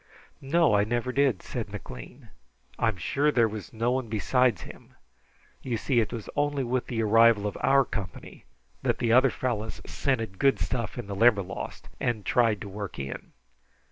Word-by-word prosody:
"No, 155 0 +3
I 100 0 +4
never 120 +3 -1
did," 135 -7 +1
said - - -5
McLean. 110 - -10 0.5
"I 115 - +2
am 110 -4 -1
sure 140 - +1
there 120 -5 +3
was 105 -4 -7
no 115 +2 0
one 130 -3 -1
besides 115 0 +1
him. - - -13 0.7
You 120 -3 -2
see, 120 +2 +1
it 110 - 0
was 115 -3 -6
only 145 -1 0
with 125 +1 -1
the 115 -2 -1
arrival 115 -1 +5
of 105 - -2
our 135 0 +4
company 100 -3 -7 0.4
that - - 0
the 115 -1 +1
other 130 +2 +6
fellows 110 -5 -3
scented 115 -8 -2
good 135 -5 +4
stuff 115 +7 -3
in 120 - -5
the 100 0 -5
Limberlost, 100 -3 +1
and 110 -5 -1
tried 115 -4 +2
to - - -6
work 100 0 -6
in. 70 0 -7
115 Hz, 175 wpm, -27 LUFS, 105-130 Hz, 0.7 s, other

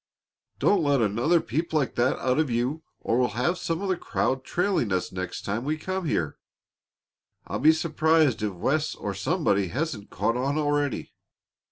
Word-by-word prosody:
"Don't 200 -3 +3
let 145 -3 +2
another 120 - +2
peep 160 +6 -3
like 150 -5 +1
that 120 +2 +1
out 130 +3 +1
of 155 -3 +1
you 125 +7 -1 0.2
or 115 - +1
we'll 125 - +3
have 175 +9 +1
some 165 +3 -2
of 195 - -2
the 185 - +2
crowd 130 -5 -1
trailing 180 - 0
us 90 -1 -1
next 95 -1 -5
time 105 +4 -2
we 155 +3 -1
come 185 +3 -3
here. 80 - -1 1.1
I'll - - -3
be 155 - +7
surprised 160 -4 +2
if 105 -2 -1
Wes 150 - 0
or 100 - -4
somebody 100 - +1
hasn't 125 - -3
caught 115 - 0
on 135 +4 0
already." 145 -2 0
140 Hz, 175 wpm, -26 LUFS, 115-160 Hz, 1.1 s, be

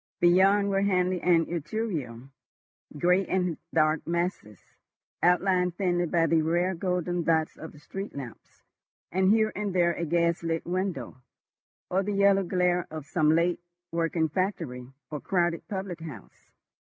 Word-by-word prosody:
Beyond 195 +3 +4
were 195 0 +1
Hanley 185 -2 +1
and 170 -2 +3
Etruria, 160 - -4 0.7
grey 180 +5 +3
and 180 -3 -1
dark 155 -1 +1
masses, 170 - -2 0.6
outlined 180 0 +2
thinly 175 -3 +1
by 165 +1 +2
the 165 -1 +3
rare 175 +4 +1
golden 180 -1 -1
dots 160 -1 +1
of 160 - -9
the - - -17
street 195 +7 -7
lamps, 130 -5 -10 0.5
and 190 +2 +3
here 220 0 +3
and 205 -3 -3
there 170 -1 +3
a 170 - -3
gaslit 170 0 0
window, 180 -9 -3 0.7
or 185 +2 +2
the 205 +1 -2
yellow 200 0 +4
glare 180 -1 0
of 155 -2 -7
some 155 +1 +2
late 170 +1 +1 0.3
working 165 -1 0
factory 155 -8 -3 0.2
or 150 - -3
crowded 175 -2 0
public 190 -4 -5
house. 160 -4 -11
175 Hz, 140 wpm, -27 LUFS, 160-185 Hz, 0.7 s, Beyond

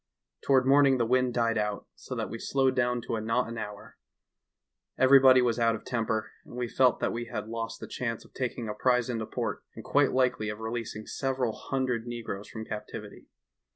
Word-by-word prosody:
Toward 130 -2 +3
morning 135 0 +5
the 120 - +1
wind 125 +1 +2
died 115 -2 +2
out, 105 -1 -2
so - - -8
that - - -2
we - - -5
slowed 135 -1 +1
down 125 -1 +1
to 115 - -2
a - - -3
knot 115 +3 0
an 115 0 -5
hour. 105 -1 -8 1.0
Every 130 +1 +7
body 130 -1 +7
was 120 -1 +1
out 115 -1 +3
of 110 - -10
temper, 110 -3 -1
as - - -14
we 125 0 -2
felt 125 +1 +3
that - - 0
we 120 +1 -3
had 110 -3 -5
lost 115 0 -4
the - - -6
chance 115 -3 -4
of - - -20
taking 125 -2 -3
a 105 - -3
prize 125 0 +1
into 110 -2 -3
port - - -3
and - - -8
quite 145 -1 +3
likely 125 -4 +1
of 105 - -4
releasing 110 -1 -4
several 130 -4 -1
hundred 125 -3 -2
negroes 115 -4 -5
from 110 -1 -7
captivity. 105 -1 -8
120 Hz, 205 wpm, -29 LUFS, 110-130 Hz, 1.0 s, Every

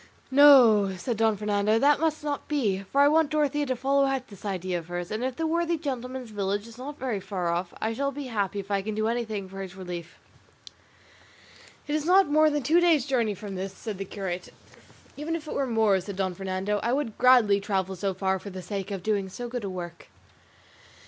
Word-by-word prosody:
"No," 245 -9 +7
said 230 +5 -3
Don 220 -1 +2
Fernando, 210 +1 +1
"that 285 +4 +4
must 315 -1 0
not 290 -1 -3
be, 225 -11 0
for 280 - +3
I 285 - +7
want 310 0 +3
Dorothea 295 -1 0
to 255 - 0
follow 275 +2 +2
out 270 -1 -2
this 200 -3 -14
idea 185 -2 -2
of 165 - -12
hers; 175 0 -5
and 215 +3 -2
if 260 -1 -2
the 325 - -2
worthy 335 +1 0
gentleman's 255 -4 -5
village 205 +1 -2
is 230 +1 -13
not 285 +3 -7
very 250 -6 -2
far 185 -3 -3
off, 175 +1 -2
I 220 +1 -1
shall 280 +4 -1
be 285 +1 -6
happy 205 -5 -2
if 200 +1 -7
I 200 -1 +1
can 215 +2 -4
do 215 +1 0
anything 225 -4 -2
for 195 +1 -8
his 190 -1 -8
relief." 175 -2 -7 1.7
"It 295 - -2
is 305 -1 0
not 380 +2 +6
more 310 +1 +4
than 295 -2 -1
two 325 +6 +4
days' 330 -7 +3
journey 235 -7 0
from 200 +1 -8
this," 190 +1 -4
said 215 -4 -6
the 195 - -3
curate. 185 -2 -5 0.7
"Even 310 +3 -3
if 320 -2 -6
it - - -4
were 275 -1 -1
more," 220 -5 +2
said 200 +2 -7
Don 190 -1 -1
Fernando, 195 +2 -2
"I 235 +2 0
would 265 -6 -2
gladly 245 -5 +5
travel 190 -2 -1
so 195 +1 -2
far 190 0 0
for 200 - -8
the 185 -1 -8
sake 195 +2 -4
of 195 -3 -5
doing 200 -3 0
so 240 +6 -6
good 245 -1 -5
a 200 - -3
work." 175 -2 -7
220 Hz, 220 wpm, -27 LUFS, 195-275 Hz, 1.7 s, No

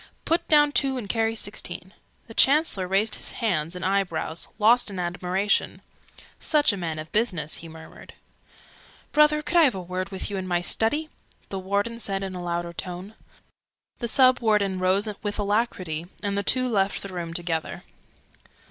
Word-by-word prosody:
"Put 330 - +1
down 295 -1 +5
two 270 -2 +1
and 230 -5 -5
carry 225 +2 0
sixteen." 190 -3 -5 0.3
The 225 - -12
Chancellor 270 - +3
raised 200 +4 +1
his - - -1
hands 170 -7 -1
and 180 - -4
eyebrows, 185 -4 -1
lost 230 +2 +4
in 195 - -7
admiration. 180 +3 -1 0.6
"Such 295 -7 +3
a - - -2
man 165 -4 -4
of 155 +1 -7
business!" 180 -9 0
he 165 - -9
murmured. 160 0 -13 1.0
"Brother, 300 0 +4
could 325 +4 0
I - - +8
have 255 -7 +2
a - - -4
word 185 +1 -4
with 190 +1 -4
you 200 - -2
in 185 -1 -4
my 175 -1 +1
Study?" 260 - 0 0.4
the 195 - -4
Warden 200 +5 -1
said 195 -3 -1
in 190 -1 -4
a 180 - -6
louder 170 0 -3
tone. 180 +4 -6 0.9
The 235 - -2
Sub 255 +2 +5
Warden 210 -5 +1
rose 190 +3 +2
with 205 -1 -3
alacrity, 200 -6 -1 0.2
and 200 -1 -1
the 200 - +1
two 255 +5 +3
left 200 -4 0
the 195 -1 -7
room 170 -2 -4
together. 165 -1 -3
195 Hz, 175 wpm, -25 LUFS, 180-230 Hz, 1.0 s, I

